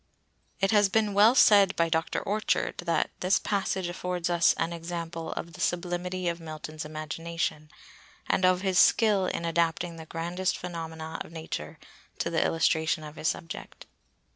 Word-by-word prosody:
It 195 Hz, -, +2 dB
has 205 Hz, -2 st, +4 dB
been 210 Hz, 0 st, +1 dB
well 210 Hz, +5 st, +6 dB
said 200 Hz, -6 st, +6 dB
by 170 Hz, -, +2 dB
Dr. 160 Hz, 0 st, -1 dB
Orchard 215 Hz, +2 st, -1 dB
that 170 Hz, -1 st, 0 dB
"this 185 Hz, +1 st, +3 dB
passage 190 Hz, -2 st, -1 dB
affords 175 Hz, 0 st, -3 dB
us 170 Hz, -1 st, +4 dB
an 165 Hz, +1 st, -2 dB
example 165 Hz, -1 st, -5 dB
of 170 Hz, -, -6 dB
the 180 Hz, -, -9 dB
sublimity 175 Hz, +1 st, -1 dB
of 170 Hz, 0 st, -1 dB
Milton's 155 Hz, -1 st, -7 dB
imagination 155 Hz, 0 st, -4 dB, 0.6 s
and -, -, +1 dB
of 185 Hz, 0 st, +4 dB
his 190 Hz, -2 st, +2 dB
skill 205 Hz, -4 st, +4 dB
in 170 Hz, -, -3 dB
adapting 170 Hz, 0 st, 0 dB
the 160 Hz, -1 st, -10 dB
grandest 175 Hz, +3 st, -2 dB
phenomena 160 Hz, -2 st, -6 dB
of -, -, -14 dB
nature 160 Hz, -, -6 dB, 0.4 s
to -, -, -2 dB
the -, -, +2 dB
illustration 160 Hz, -1 st, +1 dB
of 150 Hz, 0 st, -9 dB
his 155 Hz, -, -3 dB
subject." 165 Hz, 0 st, -5 dB
170 Hz, 160 wpm, -28 LUFS, 165-185 Hz, 0.6 s, well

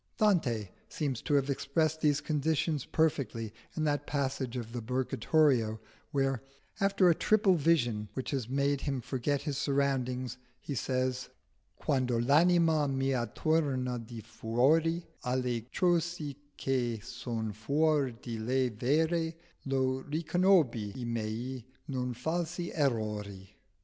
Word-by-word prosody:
Dante 130 Hz, -, +2 dB, 0.2 s
seems 140 Hz, -6 st, -2 dB
to 145 Hz, -, +1 dB
have 140 Hz, -1 st, +3 dB
expressed 155 Hz, +3 st, 0 dB
these 150 Hz, -1 st, +3 dB
conditions 155 Hz, -1 st, 0 dB
perfectly 135 Hz, -9 st, 0 dB, 0.2 s
in 155 Hz, -, 0 dB
that 145 Hz, -1 st, 0 dB
passage 130 Hz, -3 st, -2 dB
of 115 Hz, -2 st, -5 dB
the 120 Hz, -, -3 dB
Purgatorio 125 Hz, -1 st, +2 dB, 0.3 s
where, 135 Hz, -3 st, 0 dB, 0.4 s
after 195 Hz, -1 st, +4 dB
a 170 Hz, -, +7 dB
triple 210 Hz, +3 st, +3 dB
vision 120 Hz, -, +2 dB
which 130 Hz, -, -3 dB
has 130 Hz, -5 st, -2 dB
made 140 Hz, +1 st, +1 dB
him 135 Hz, -3 st, -1 dB
forget 135 Hz, +3 st, -1 dB
his 145 Hz, -3 st, -2 dB
surroundings, 130 Hz, -3 st, 0 dB, 0.2 s
he 145 Hz, -, -5 dB
says 130 Hz, 0 st, -1 dB, 0.5 s
"Quando 130 Hz, -3 st, +1 dB
l'anima 160 Hz, +3 st, +4 dB
mia 135 Hz, -3 st, 0 dB
tornò 135 Hz, -6 st, +1 dB
di 115 Hz, 0 st, -8 dB
fuori 135 Hz, +10 st, +1 dB, 0.2 s
Alle 125 Hz, -2 st, -1 dB
cose 170 Hz, -4 st, +1 dB, 0.2 s
che 120 Hz, -4 st, 0 dB
son 115 Hz, -2 st, -4 dB
fuor 140 Hz, +5 st, +2 dB
di 115 Hz, -3 st, -5 dB
lei 130 Hz, +3 st, +1 dB
vere, 160 Hz, +8 st, +1 dB, 0.3 s
Io 130 Hz, -1 st, +1 dB
riconobbi 155 Hz, -, +2 dB
i 125 Hz, -, -4 dB
miei 115 Hz, +2 st, -3 dB, 0.3 s
non 125 Hz, -2 st, -2 dB
falsi 170 Hz, +6 st, -2 dB
errori." 105 Hz, -8 st, -1 dB
135 Hz, 125 wpm, -31 LUFS, 120-155 Hz, 0.5 s, a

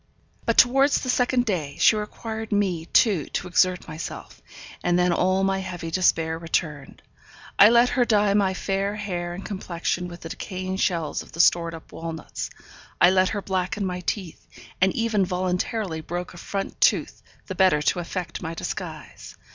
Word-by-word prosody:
But 230 Hz, -, +1 dB
towards 270 Hz, +4 st, +5 dB
the 255 Hz, -, 0 dB
second 250 Hz, 0 st, +2 dB
day, 160 Hz, -, -2 dB
she -, -, +6 dB
required 220 Hz, +1 st, -5 dB
me, 185 Hz, -5 st, 0 dB
too, 200 Hz, -, +3 dB
to 180 Hz, -, -2 dB
exert 180 Hz, +1 st, +2 dB
myself; 155 Hz, +1 st, -8 dB, 0.4 s
and 175 Hz, 0 st, +2 dB
then 180 Hz, 0 st, +3 dB
all 185 Hz, +2 st, +2 dB
my 195 Hz, 0 st, +1 dB
heavy 175 Hz, -3 st, -6 dB
despair 165 Hz, -2 st, +1 dB
returned. 155 Hz, -4 st, -3 dB, 0.6 s
I 205 Hz, -, +10 dB
let 240 Hz, +1 st, +5 dB
her 250 Hz, -, +2 dB
dye 210 Hz, -3 st, +3 dB
my 195 Hz, -2 st, +2 dB
fair 195 Hz, +2 st, -1 dB
hair 175 Hz, -4 st, -4 dB
and 195 Hz, -, -8 dB
complexion 180 Hz, -2 st, -3 dB
with 175 Hz, 0 st, -10 dB
the 165 Hz, -, -7 dB
decaying 185 Hz, +2 st, -5 dB
shells 165 Hz, -6 st, -1 dB
of -, -, -14 dB
the 165 Hz, -, -10 dB
stored 170 Hz, -1 st, +3 dB
up 160 Hz, -, -13 dB
walnuts, 165 Hz, -1 st, -6 dB, 0.5 s
I 175 Hz, -, +7 dB
let 185 Hz, 0 st, +3 dB
her 205 Hz, -2 st, -3 dB
blacken 190 Hz, +1 st, -2 dB
my 180 Hz, -1 st, -3 dB
teeth, 180 Hz, -1 st, -5 dB, 0.3 s
and 190 Hz, 0 st, +4 dB
even 225 Hz, -4 st, +1 dB
voluntarily 180 Hz, 0 st, -2 dB
broke 175 Hz, +3 st, -5 dB
a -, -, -12 dB
front 195 Hz, +3 st, -5 dB
tooth -, -, +2 dB, 0.2 s
the -, -, -5 dB
better 185 Hz, -6 st, +3 dB
to 180 Hz, -, +1 dB
effect 175 Hz, 0 st, -5 dB
my 165 Hz, 0 st, -5 dB
disguise. -, -, -7 dB
185 Hz, 170 wpm, -24 LUFS, 170-205 Hz, 0.6 s, I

